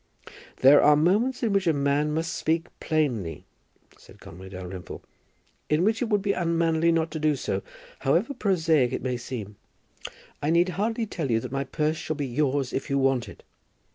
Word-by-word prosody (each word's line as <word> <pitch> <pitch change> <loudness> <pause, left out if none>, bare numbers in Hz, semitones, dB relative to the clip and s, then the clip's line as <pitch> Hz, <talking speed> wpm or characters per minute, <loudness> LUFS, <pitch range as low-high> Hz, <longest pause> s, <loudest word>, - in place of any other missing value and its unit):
"There 140 +2 +8
are 150 0 +6
moments 210 - +1
in 220 -3 +1
which 195 -2 +1
a 165 - +4
man 145 +1 +1
must 165 +3 -2
speak 165 +1 0
plainly," 125 - -1 0.5
said 105 - -17
Conway 95 -1 -11
Dalrymple; 95 -1 -8 0.7
"in 150 +3 +2
which 220 +2 +1
it 240 - -1
would 205 -3 +1
be 200 -1 +1
unmanly 165 -2 +1
not 165 -1 0
to 160 - -4
do 155 -1 +2
so, - - -3 0.4
however 280 - +1
prosaic 160 - +1
it - - -3
may 130 -1 -1
seem. 115 -4 -7 0.8
I 145 - 0
need 170 +2 +3
hardly 220 +6 -1
tell 165 -9 -4
you 115 -1 +2
that - - -7
my 135 0 -2
purse 155 +3 -1
shall 160 -1 -4
be 145 -1 -3
yours 135 0 -1
if 135 - -3
you 140 - +1
want 135 -2 +1
it." - - -14
155 Hz, 185 wpm, -26 LUFS, 135-170 Hz, 0.8 s, There